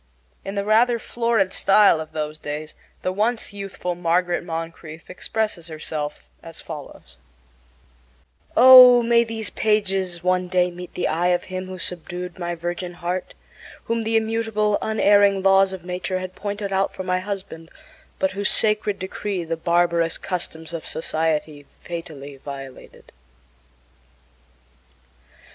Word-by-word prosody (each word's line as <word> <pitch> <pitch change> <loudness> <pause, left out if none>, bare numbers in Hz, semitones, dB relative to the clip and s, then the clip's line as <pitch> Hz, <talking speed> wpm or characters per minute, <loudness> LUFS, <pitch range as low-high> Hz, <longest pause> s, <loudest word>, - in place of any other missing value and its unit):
In 195 - -6
the 200 - -1
rather 235 +3 +4
florid 230 -4 0
style 195 -4 +5
of 155 - -9
those 155 0 -4
days 150 +1 -6 0.3
the 185 - 0
once 215 +2 -1
youthful 195 -3 -4
Margaret 175 +1 0
Moncrieffe 165 -1 -7
expresses 190 -2 -3
herself 155 - -5
as - - -10
follows: 65 -2 -10 1.4
Oh, 250 -1 +10
may 235 0 +4
these 225 -1 -4
pages 195 -5 0
one 180 0 +1
day 180 0 +1
meet 180 0 -10
the - - 0
eye 170 +3 0
of 180 0 +1
him 185 0 -6
who 185 0 -7
subdued 180 0 -6
my 175 -1 -3
virgin 175 +1 -5
heart, 180 +1 -4 0.5
whom 230 0 -1
the 225 0 +1
immutable, 220 -2 0
unerring 205 -2 +3
laws 195 0 +5
of 185 -2 -8
nature 180 +1 -3
had 185 0 -6
pointed 200 0 -4
out 195 0 +1
for 185 - -5
my 185 0 0
husband, 185 -4 -6 0.5
but 190 - 0
whose 200 +2 -1
sacred 210 -2 +2
decree 190 0 -4
the 165 0 -3
barbarous 170 0 +1
customs 170 -2 -4
of 165 - -5
society 155 -2 -2
fatally 150 -5 -8
violated! 135 -1 -10
185 Hz, 135 wpm, -22 LUFS, 165-205 Hz, 1.4 s, Oh